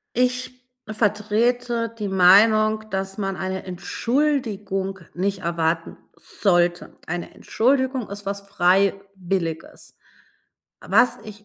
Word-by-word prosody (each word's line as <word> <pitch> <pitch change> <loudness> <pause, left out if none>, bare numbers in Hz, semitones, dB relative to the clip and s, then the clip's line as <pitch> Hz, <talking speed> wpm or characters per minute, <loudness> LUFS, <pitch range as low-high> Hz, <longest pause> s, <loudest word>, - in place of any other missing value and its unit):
Ich 250 0 -1 0.2
vertrete 230 +3 0
die 210 -2 -3
Meinung, 215 +4 +5
dass 190 0 -3
man 195 -2 -2
eine 190 +1 -4
Entschuldigung 200 -1 -2 0.2
nicht 195 +2 -1
erwarten 165 -1 -2 0.2
sollte. 175 -3 0
Eine 175 +1 -5
Entschuldigung 260 0 0
ist 205 0 -6
was 200 0 -3
Freiwilliges. 195 -2 -1 0.9
Was 250 - +3
ich 210 -1 -11
200 Hz, 95 wpm, -23 LUFS, 190-225 Hz, 0.9 s, Meinung